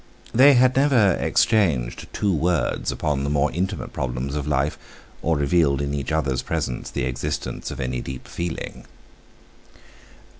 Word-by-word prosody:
They 135 +4 +7
had 125 +1 +4
never 130 -8 +4
exchanged 80 - +1
two 100 -2 0
words 85 +2 0
upon 75 -3 -1
the 70 - -1
more 75 0 +1
intimate 95 +3 -3
problems 65 +1 -3
of 75 -1 -3
life, 75 0 +1 0.5
or 80 -1 +1
revealed 70 -1 +2
in 70 0 -2
each 70 +1 -3
other's 70 -5 0
presence 60 - -3
the - - -3
existence 65 +3 -3
of - - -7
any 65 -2 -2
deep 65 -1 -7
feeling. 85 -1 -5
75 Hz, 145 wpm, -23 LUFS, 65-90 Hz, 0.5 s, They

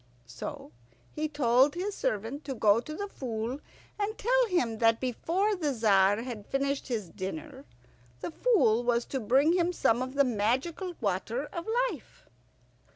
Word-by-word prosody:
So 120 +4 -8 0.4
he 310 0 -1
told 275 -1 +3
his 390 +4 -2
servant 225 - -2
to 270 -2 -4
go 215 -1 +4
to 305 +6 -7
the 405 +3 -4
Fool 245 - -4 0.4
and 420 +2 -2
tell - - +2
him 245 - 0
that 225 -1 +4
before 345 - 0
the 310 -6 -1
Tzar 205 -2 +3
had 235 -5 -7
finished 275 0 -1
his 220 -8 -3
dinner 265 - -7 0.5
the - - -5
Fool 315 - +3
was 240 -1 +1
to 270 - -3
bring 265 +8 +3
him 350 -1 +2
some 240 -8 +2
of 260 +1 -4
the 280 - +5
magical 260 - -1
water 220 +6 -1
of 340 +3 -5 0.2
life. 300 - -13
260 Hz, 155 wpm, -29 LUFS, 225-325 Hz, 0.5 s, the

